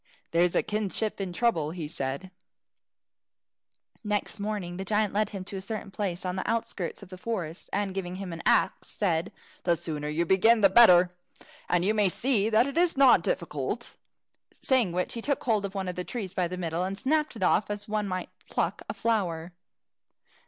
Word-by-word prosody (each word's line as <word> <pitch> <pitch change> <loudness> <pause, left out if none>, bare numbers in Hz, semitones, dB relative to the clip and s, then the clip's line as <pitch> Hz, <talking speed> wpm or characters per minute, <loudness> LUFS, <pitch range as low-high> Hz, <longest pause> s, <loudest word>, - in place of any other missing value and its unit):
"There's 170 +1 +3
a - - +3
kinship 210 0 -2
in 190 -2 -3
trouble," 175 -7 +1 0.2
said 135 +2 -3
he. 190 - -12 1.7
Next 210 0 -1
morning 200 -4 -3
the 190 - -3
giant 210 +1 0
led 210 +1 +1
him 195 -3 -6
to 195 - -6
a - - -5
certain 210 0 -5
place 190 -3 -3
on 180 0 -2
the 185 - -3
outskirts 215 -5 -3
of 190 - -13
the 185 -1 -9
forest, 180 -7 -4
and 200 -1 -1
giving 185 -2 -4
him 185 -2 -5
an 165 - -6
axe, - - +2
said, 175 -3 -1 0.3
"The 170 -1 +2
sooner 150 -3 -4
you 165 +3 0
begin, 220 +6 +4
the 195 -2 +6
better, 180 -5 +7 0.6
and 175 0 +2
you 210 - +3
may 210 -3 +3
see 220 0 +1
that 225 +2 +4
it 280 +3 -4
is 345 -4 +3
not 270 -2 +7
difficult." - - -3 0.7
Saying 250 -8 +3
which, 180 +1 -1
he 230 - -4
took 280 +3 -1
hold 215 -4 +1
of 195 0 -6
one 190 -1 -2
of 180 - -3
the 180 - -3
trees 200 -3 -5
by 185 -3 0
the 180 +2 -5
middle, 170 -1 -2
and 190 +1 -3
snapped 300 +3 0
it 205 - -4
off 205 - +3
as 205 0 -4
one 210 -1 -1
might 185 -1 -4 0.2
pluck - - -1
a - - -3
flower. 180 -7 -1
195 Hz, 195 wpm, -28 LUFS, 180-215 Hz, 1.7 s, better